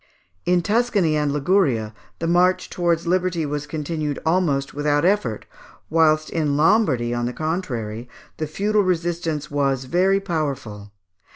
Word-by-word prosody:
In 175 -1 +3
Tuscany 205 -6 +1
and 150 -1 +1
Liguria, 140 - +1 0.2
the 165 - -4
march 180 +2 +2
towards 170 -1 0
liberty 180 -2 0
was 145 0 -4
continued 150 -1 -3
almost 160 -5 +1
without 145 +1 +1
effort; 180 - 0 0.5
whilst 155 -1 +3
in 150 -4 0
Lombardy, 150 - +3
on 120 0 -1
the 125 - -4
contrary, 125 - -4 0.3
the 155 - -3
feudal 205 +7 +1
resistance 170 -4 -2
was 135 -2 0
very 185 +7 +2
powerful. 140 - -4
155 Hz, 130 wpm, -22 LUFS, 140-180 Hz, 0.5 s, In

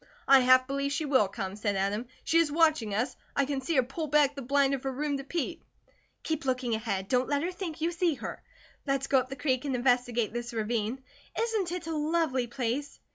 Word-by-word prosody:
"I 275 0 +8
half 255 0 +6
believe 275 +1 -2
she 305 +2 -1
will 260 -8 +3
come," 190 0 -5
said 205 -1 -1
Adam. 200 +5 -1 0.2
"She 330 - +3
is 325 -3 +2
watching 310 -10 +2
us; 240 +6 -1 0.2
I 280 - +3
can 275 -1 -2
see 325 +5 -1
her 260 - +5
pull 305 +6 -4
back 290 -1 +4
the 280 - -7
blind 275 +2 +2
of 270 - -2
her 270 - -2
room 285 +2 -2
to 275 - -6
peep." 335 +3 -3 0.6
"Keep 315 0 -2
looking 255 -2 0
ahead. 195 -3 -2
Don't 250 +3 +1
let 285 0 +1
her 355 - -1
think 350 -4 -6
you 335 +2 +1
see 340 -2 +1
her. 235 - -7 0.5
Let's 275 0 +1
go 275 -1 +4
up 255 0 -4
the 270 - -5
creek 255 -1 0
and 275 -3 -1
investigate 245 -3 +1
this 240 0 -4
ravine. 225 +3 -2 0.4
Isn't 440 -6 0
it 355 -1 -4
a 325 -1 -3
lovely 300 -5 0
place?" 255 +3 -3
270 Hz, 225 wpm, -29 LUFS, 245-300 Hz, 0.6 s, I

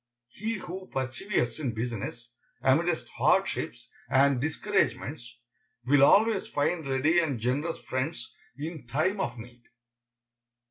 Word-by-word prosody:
He 220 - -3
who 185 -1 -7
perseveres 130 - -1
in 130 -7 -2
business, 120 +1 -4 0.3
amidst 160 +6 +2
hardships - - +1 0.2
and 135 -1 +4
discouragements, 155 - -1 0.5
will 140 +2 +5
always 210 +8 +5
find 155 +1 -1
ready 140 +6 +3
and 145 -8 0
generous 140 +8 -1
friends 130 0 -4 0.2
in 155 -2 -6
time 160 - 0
of 125 -10 -2
need. 120 +1 -11
145 Hz, 110 wpm, -28 LUFS, 125-170 Hz, 0.5 s, will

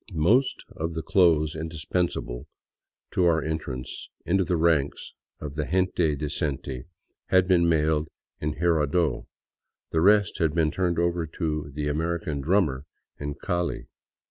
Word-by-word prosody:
Most 105 - +2
of 80 +1 -3
the 80 - -3
clothes 80 -5 +3
indispensible 80 -4 -3 0.6
to 90 - +2
our 80 -3 +3
entrance 75 -5 -4 0.2
into 95 +3 +2
the 90 -1 0
ranks 80 -4 +1 0.3
of 75 -2 -6
the 75 0 -2
gente 90 -3 +1
decente 70 -3 -3 0.4
had 95 -1 +4
been 85 -2 +4
mailed 80 -1 +2 0.3
in 75 0 -2
Jirardot, 80 -1 +1 0.6
the 80 - +2
rest 100 +1 +4
had 80 -1 +1
been 80 -2 +2
turned 90 -3 0
over 85 -1 0
to 75 -2 -3
the 75 -1 -2
American 80 -1 -1
drummer 75 -5 +1 0.2
" - - -47
in 70 0 -4
Call. 85 +3 -1
80 Hz, 140 wpm, -26 LUFS, 75-85 Hz, 0.6 s, had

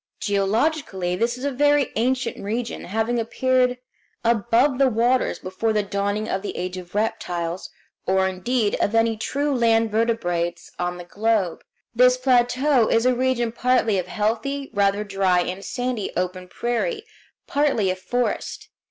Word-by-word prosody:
Geologically 200 - 0
this 235 +5 0
is 250 - -9
a 285 - 0
very 290 +1 +2
ancient 250 +1 0
region, 230 +4 -3
having 225 +4 -1
appeared 250 +2 +1 0.5
above 235 +4 +2
the 275 - +5
waters 245 +2 +1
before 190 +4 -2
the 210 -1 +1
dawning 200 +2 -2
of 190 - -2
the 205 - -5
age 180 0 -3
of 180 0 -9
reptiles, 180 -5 -2 0.4
or, 190 0 +3
indeed, 205 +4 0
of 210 - +1
any 225 0 +3
true 285 +6 -1
land 230 -3 +2
vertebrates 210 -7 -1
on 180 0 -2
the 175 - -7
globe. 205 -3 0 0.3
This 250 +1 +5
plateau 255 0 +3
is 230 +1 +2
a 255 - +4
region 245 -2 0
partly 235 -4 +2
of 180 - -4
healthy, 235 +6 -2
rather 200 +1 +2
dry 195 -3 +2
and 185 +2 -4
sandy, 245 -4 -3
open 180 0 -2
prairie, 330 - -2 0.4
partly 275 -10 +1
of 185 - -5
forest. 245 +6 -2
225 Hz, 150 wpm, -23 LUFS, 195-250 Hz, 0.5 s, the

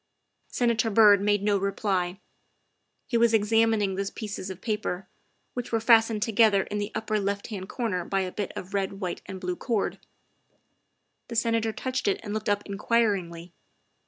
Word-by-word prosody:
' - - -51
' - - -50
Senator 235 -2 +1
Byrd 205 -2 +6
made 205 0 +2
no 205 -1 +2
reply. 195 -2 -1 0.9
He 235 - 0
was 230 -1 +4
examining 220 -1 +2
the 195 +1 -3
pieces 205 -3 -5
of 190 -1 -7
paper, 210 -3 -3 0.5
which 245 -1 -5
were 225 - +2
fastened 225 -2 +4
together 220 -3 +4
in 210 - -4
the 205 +1 -3
upper 215 -1 -1
left 200 +1 -2
hand 195 -3 -6
corner 210 -8 -2
by 195 +2 -1
a 185 -1 -3
bit 205 -1 -4
of 185 +2 -7
red, 195 -1 -1
white, 180 -3 -4
and 190 -1 -6
blue 180 -1 -3
cord. 225 0 -2 1.3
The 235 - -7
Senator 230 -1 +1
touched 255 +2 -3
it 200 - +1
and 205 -2 -5
looked 215 -1 -2
up 205 0 +1
in 200 -1 -6
quiringly. 180 -7 0
205 Hz, 180 wpm, -27 LUFS, 195-225 Hz, 1.3 s, Byrd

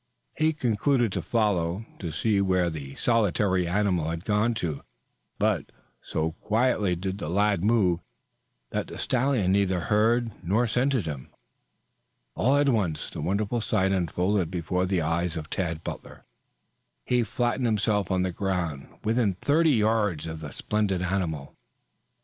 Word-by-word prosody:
He 155 +1 +2
concluded 120 -2 +1
to - - -2
follow, 100 -3 0
to 85 -5 -4
see 100 +4 +1
where 90 -3 +2
the 70 -3 -7
solitary 100 -5 +2
animal 90 -3 +1
had 85 +2 -4
gone 105 +3 +2
to. 80 -9 -3 0.6
But - - 0 0.3
so 80 +1 -2
quietly 110 -4 +1
did 95 +3 -4
the 75 - -4
lad 100 0 +2
move 100 -6 +3 0.7
that - - -2
the - - -8
stallion 125 -7 +1
neither 95 -2 +2
heard 115 +5 +2
nor 105 +8 +2
scented 125 -2 +1
him. 70 -4 -6 1.0
All 135 - +2
at 145 0 +3
once 100 - 0
the - - -6
wonderful 100 +7 0
sight 95 -3 +1
unfolded 90 0 0
before 90 +1 -1
the 90 -3 +1
eyes 85 +1 -1
of 80 0 -7
Tad 85 -3 -2
Butler. - - -8 0.8
He 125 -1 +2
flattened 120 +2 0
himself 105 -3 +1
on 95 -1 +1
the 95 - -1
ground, 85 -7 -2 0.2
within 110 -3 +1
thirty 155 - +3
yards 105 - +2
of 80 -1 -5
the 75 -2 -7
splendid 100 -4 -1
animal. 85 -6 -2
100 Hz, 145 wpm, -26 LUFS, 85-110 Hz, 1.0 s, move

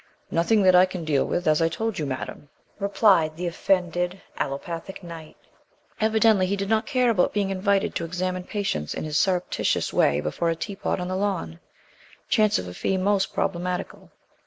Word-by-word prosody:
"Nothing 195 +6 +3
that 185 -1 +6
I 180 +1 +7
can 180 -3 -6
deal 145 -3 +2
with, 175 - -2
as 155 +1 +3
I 165 - +3
told 225 0 -3
you, 150 - -2
Madam," 135 +2 -6 0.3
replied 195 -6 +3
the 180 - -3
offended 180 +1 0 0.2
allopathic 165 +7 -5
Knight. 165 -2 -10 0.6
Evidently 220 -3 +3
he 200 - 0
did 200 0 -3
not 220 0 +1
care 255 -4 +2
about 185 -5 +2
being 200 -2 0
invited 195 +1 +1
to 170 - -2
examine 185 +1 -3
patients 195 - -2
in - - -4
this 155 0 0
surreptitious 180 -2 0
way 70 0 +3
before 170 - -1
a 165 - 0
teapot 195 +3 -3
on 180 - -3
the 185 - -2
lawn, 185 - -2 0.7
chance 215 -1 +3
of 90 - -4
a 90 - -7
fee 190 - -1
most 195 +1 +1
problematical. 180 0 -3
185 Hz, 180 wpm, -25 LUFS, 165-200 Hz, 0.7 s, I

